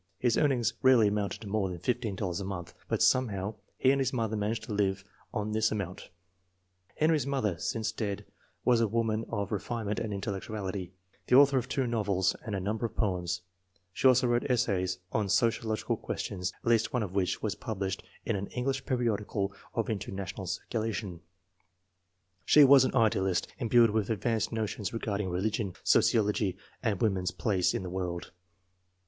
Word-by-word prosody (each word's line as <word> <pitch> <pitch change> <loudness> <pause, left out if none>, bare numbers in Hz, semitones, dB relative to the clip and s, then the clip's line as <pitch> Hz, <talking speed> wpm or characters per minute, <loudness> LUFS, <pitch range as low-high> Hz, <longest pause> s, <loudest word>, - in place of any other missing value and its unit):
His 120 -2 +2
earnings 125 -6 +2
rarely 125 -5 +6
amounted 100 -1 -2
to 110 - -8
more 100 -1 0
than 90 - -5
$15 100 -2 -2
a - - -3
month, 95 -3 -5
but - - +1
some 130 0 +4
how 100 0 -4 0.2
he 130 - +4
and 140 0 +2
his 130 -1 +1
mother 115 -3 -1
managed 110 +2 -1
to 110 - -5
live 100 -1 0 0.3
on 105 0 -2
this 110 0 +2
amount. 100 -4 -4 0.9
Henry's 155 -3 +2
mother, 120 -11 0
since 110 -1 -1
dead, 105 -3 -3 0.4
was 120 -2 +4
a 115 - +3
woman 115 0 0
of 100 -2 -3
refine 110 +2 -3
ment 105 +1 -1
and 110 - -3
intellectuality, 100 -2 -4 0.4
the - - +4
author 140 0 +7
of 125 +1 -6
two 135 0 0
novels 100 -6 +1
and 110 -4 -3
a - - -1
number 105 +5 -1
of 110 - -18
poems. 90 -4 -1 0.5
She 135 - +3
also 130 0 +5
wrote 120 +2 +1
essays 95 -7 +1
on 105 -3 0
socio 115 +1 +2
logical 110 - -1
questions, 90 0 -3
at - - -8
least 115 -2 +3
one 125 -3 +1
of 95 -3 -5
which 95 -2 0
was 110 -1 0
published 100 -2 -3 0.2
in 115 - 0
an 100 0 -3
English 135 +2 -2
periodical 105 -6 -1 0.2
of 115 - 0
international 95 -2 -4
circulation. 100 -1 -3 1.2
She 150 +8 +7
was 135 -1 +8
an - - -2
idealist, 95 -6 +2
imbued 120 -2 +5
with 110 -1 0
advanced 110 0 0
notions 110 -2 -3
regarding 105 -4 -2
religion, 100 +2 -1
sociology, 105 -4 +3 0.2
and 110 -7 0
woman's 95 -5 +1
place 95 -4 +1
in - - -2
the 90 - -5
world. 90 -2 -4
105 Hz, 175 wpm, -30 LUFS, 95-115 Hz, 1.2 s, was